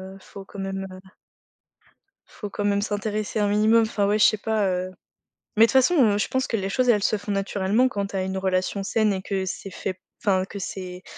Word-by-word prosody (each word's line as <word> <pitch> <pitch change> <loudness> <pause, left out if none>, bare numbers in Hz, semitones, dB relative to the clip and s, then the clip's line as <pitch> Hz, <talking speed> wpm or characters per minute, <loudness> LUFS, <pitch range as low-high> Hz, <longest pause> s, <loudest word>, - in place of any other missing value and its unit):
heu, - - -12
faut 195 +1 -11
quand 200 - -11
même, 195 0 -3
heu 185 - -10 1.3
faut 205 - -8
quand 205 +1 -3
même 200 0 +2
s'intéresser 210 0 -2
un 205 - +2
minimum, 215 +2 +4
enfin 210 -2 0
ouais 210 +1 +2
je - - +5
sais 215 - +4
pas, 215 -2 0
heu. 185 0 -2 0.7
Mais 225 - +8
toute - - -1
façon, 265 +7 +4 0.2
heu, - - 0
je - - 0
pense 260 0 -1
que 225 - -1
les 195 -1 -2
choses 250 +4 +1
elles 210 -4 +4
se 215 - +2
font 205 0 -6
naturellement 195 +4 +1
quand 200 -4 -3
tu 195 - -9
as 190 - 0
une 190 0 -3
relation 190 +1 -1
saine 215 +1 +1
et 190 - -3
que 190 -1 -2
c'est 190 +1 -5
fait 185 0 -5 0.2
enfin, 190 -3 +2
que 200 - -8
c'est 180 -1 -6
200 Hz, 230 wpm, -24 LUFS, 190-215 Hz, 1.3 s, Mais